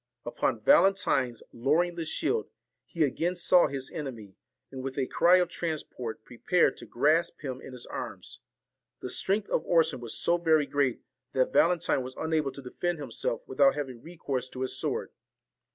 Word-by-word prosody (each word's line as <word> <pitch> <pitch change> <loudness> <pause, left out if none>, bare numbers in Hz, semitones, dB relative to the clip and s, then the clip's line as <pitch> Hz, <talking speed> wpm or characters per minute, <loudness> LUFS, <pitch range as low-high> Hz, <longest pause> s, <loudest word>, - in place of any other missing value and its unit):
Upon - - -1
Valentine's 190 - +3
lowering 155 +9 +1
the 170 -1 -4
shield, 435 - -1 0.4
he 165 -3 -1
again 165 +6 0
saw 175 0 +4
his 135 -2 -4
enemy, 120 - -7 0.4
and 130 -1 -6
with 135 0 -5
a 135 - +1
cry 175 +7 +4
of 180 -1 +2
transport 155 -10 -5
prepared 170 +11 +1
to - - -10
grasp 155 +7 +1
him 130 -3 -5
in - - -10
his 125 -1 -9
arms. - - -7 0.6
The - - -5
strength 200 +1 0
of - - 0
Orson 165 -4 +2
was 120 -2 -3
so 170 - +2
very 160 -3 +3
great, 140 -4 0 0.3
that 130 -1 +1
Valentine 170 -5 +3
was 130 +1 -7
unable 160 -3 0
to 140 - -10
defend 175 +7 -2
himself 125 -4 -3
without 135 +1 +4
having 130 -5 -5
recourse 135 -6 -4
to 130 - -8
his 130 - 0
sword. - - -2
145 Hz, 170 wpm, -28 LUFS, 130-170 Hz, 0.6 s, saw